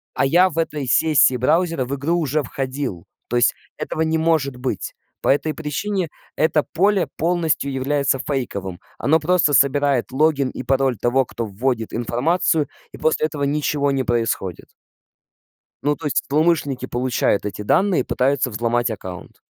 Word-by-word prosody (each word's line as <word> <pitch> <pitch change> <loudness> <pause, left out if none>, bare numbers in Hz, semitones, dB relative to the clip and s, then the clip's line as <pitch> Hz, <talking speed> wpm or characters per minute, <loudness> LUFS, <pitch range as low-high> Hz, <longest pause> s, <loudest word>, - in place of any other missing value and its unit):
а - - +2
я 180 +7 +4
в 165 - -10
этой 150 -4 -1
сессии 150 -3 +4
браузера 160 +1 +1
в 135 - -5
игру 145 +5 -1
уже 155 -2 0
входил, 130 -7 -4 0.2
то 120 - -3
есть 120 - +4 0.2
этого 160 - -3
не 160 0 +1
может 160 -5 +1
быть. 125 -5 -4 0.3
По - - 0
этой 150 +3 +2
причине 165 +4 -2 0.3
это 155 -1 +2
поле 190 -1 +2
полностью 165 -4 0
является 135 +1 0
фейковым, 100 -11 -4 0.2
оно 155 +6 +3
просто 165 -2 +2
собирает 140 -2 +2
логин 140 -1 +2
и - - -7
пароль 135 -3 +1
того, 130 +2 +2
кто 120 -1 -5
вводит 110 +2 -2
информацию, 150 - +1 0.3
и - - -9
после 155 0 +1
этого 145 -2 -5
ничего 145 0 0
не 135 -1 0
происходит. 115 -7 -1 1.2
Ну, 145 +1 +2
то 155 - -8
есть 145 - 0
злоумышленники 150 -3 +1
получают 120 -4 0
эти 105 0 -5
данные 190 - +2
и - - -1
пытаются 135 0 +1
взломать 120 +2 0
аккаунт. 95 -4 -8
140 Hz, 155 wpm, -21 LUFS, 125-160 Hz, 1.2 s, я